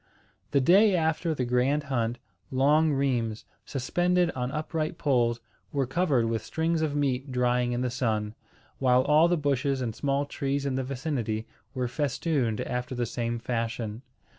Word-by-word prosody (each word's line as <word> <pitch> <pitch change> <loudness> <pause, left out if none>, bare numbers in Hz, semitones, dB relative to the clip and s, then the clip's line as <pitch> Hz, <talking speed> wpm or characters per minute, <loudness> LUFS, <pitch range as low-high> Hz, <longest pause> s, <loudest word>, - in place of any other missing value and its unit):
The 140 - +3
day 195 +8 +5
after 160 0 0
the 130 - -1
grand 125 +5 +1
hunt, 120 -4 -1 0.3
long 150 +4 +3
rheims, 125 -6 0 0.2
suspended 175 +6 +1
on 125 0 -3
upright 155 +1 -2
poles, 120 -5 +1 0.3
were 140 -2 0
covered 135 -3 +1
with 115 0 -1
strings 160 0 -1
of 150 -2 -1
meat 135 -2 -1
drying 125 -1 +1
in 120 0 -1
the 125 -1 -1
sun, 110 -4 -1 0.5
while 125 -1 +4
all 150 +4 +5
the 175 0 +2
bushes 140 -2 0
and 115 -4 -3
small 140 0 0
trees 140 0 -2
in 140 - 0
the 130 0 -1
vicinity 125 -5 -3 0.3
were 125 -1 -1
festooned 135 -3 -1
after 125 +1 -3
the 120 0 0
same 115 0 -2
fashion. 115 -1 -3
130 Hz, 160 wpm, -27 LUFS, 120-150 Hz, 0.5 s, day